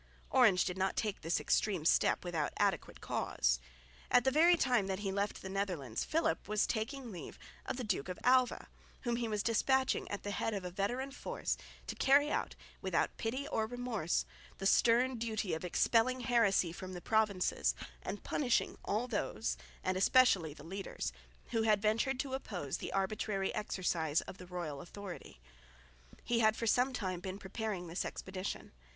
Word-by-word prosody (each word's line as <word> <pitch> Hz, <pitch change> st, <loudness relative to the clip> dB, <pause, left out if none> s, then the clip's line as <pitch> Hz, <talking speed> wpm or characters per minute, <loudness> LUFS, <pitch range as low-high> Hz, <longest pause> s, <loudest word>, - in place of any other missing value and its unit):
Orange 220 Hz, -9 st, +5 dB
did 180 Hz, +1 st, -3 dB
not 190 Hz, 0 st, +1 dB
take 210 Hz, -3 st, -2 dB
this 165 Hz, +2 st, 0 dB
extreme 190 Hz, -7 st, +1 dB
step 170 Hz, -, +3 dB
without 165 Hz, -4 st, -1 dB
adequate -, -, 0 dB
cause. -, -, 0 dB, 0.5 s
At 245 Hz, -, +5 dB
the 265 Hz, -, +3 dB
very 335 Hz, +5 st, +6 dB
time 245 Hz, -9 st, +2 dB
that 190 Hz, +1 st, -2 dB
he 195 Hz, -2 st, -1 dB
left 200 Hz, +1 st, -2 dB
the -, -, -5 dB
Netherlands 180 Hz, -, -2 dB
Philip 310 Hz, -, 0 dB
was 210 Hz, +1 st, +2 dB
taking 245 Hz, +2 st, -3 dB
leave 180 Hz, -, -8 dB, 0.3 s
of -, -, -2 dB
the 255 Hz, -, -3 dB
Duke 190 Hz, -7 st, -1 dB
of 180 Hz, -, -4 dB
Alva, 255 Hz, 0 st, +3 dB, 0.3 s
whom 240 Hz, -2 st, 0 dB
he 235 Hz, -1 st, -1 dB
was 210 Hz, -2 st, -1 dB
despatching 260 Hz, +3 st, +2 dB
at 205 Hz, -, -4 dB
the 205 Hz, -, -3 dB
head 210 Hz, +2 st, -1 dB
of 195 Hz, -2 st, -4 dB
a 180 Hz, -, -4 dB
veteran 245 Hz, +9 st, -2 dB
force -, -, -3 dB, 0.3 s
to -, -, -4 dB
carry 285 Hz, +2 st, +4 dB
out -, -, -1 dB, 0.3 s
without -, -, 0 dB
pity 260 Hz, +5 st, -2 dB
or 220 Hz, 0 st, 0 dB
remorse 235 Hz, -8 st, -1 dB, 0.3 s
the 195 Hz, -, -5 dB
stern 240 Hz, +4 st, +4 dB
duty 220 Hz, -4 st, -1 dB
of 160 Hz, -, -3 dB
expelling 235 Hz, +7 st, +2 dB
heresy 225 Hz, -8 st, +3 dB
from 185 Hz, +2 st, -7 dB
the 175 Hz, -, -6 dB
provinces 200 Hz, -, +1 dB, 0.3 s
and 205 Hz, -, -5 dB
punishing 255 Hz, -5 st, 0 dB
all 220 Hz, +4 st, 0 dB
those, 135 Hz, -, -1 dB, 0.3 s
and 185 Hz, -, 0 dB
especially 185 Hz, -, +4 dB
the 150 Hz, -, -12 dB
leaders, 170 Hz, -, -4 dB, 0.4 s
who 225 Hz, -, +1 dB
had 215 Hz, -2 st, +4 dB
ventured 230 Hz, +5 st, +1 dB
to 270 Hz, -2 st, -6 dB
oppose 180 Hz, -, -3 dB
the -, -, -5 dB
arbitrary 195 Hz, 0 st, -1 dB
exercise 175 Hz, -7 st, 0 dB
of -, -, -10 dB
the 180 Hz, -, -10 dB
royal 170 Hz, -6 st, -4 dB
authority. 180 Hz, -, -9 dB, 0.8 s
He 235 Hz, -1 st, +1 dB
had 220 Hz, -1 st, +4 dB
for 230 Hz, -, -3 dB
some 250 Hz, +4 st, +3 dB
time 190 Hz, -8 st, -3 dB
been 185 Hz, +2 st, -5 dB
preparing 200 Hz, -1 st, -4 dB
this 170 Hz, +2 st, -2 dB
expedition. 190 Hz, +1 st, -5 dB
205 Hz, 175 wpm, -34 LUFS, 180-240 Hz, 0.8 s, very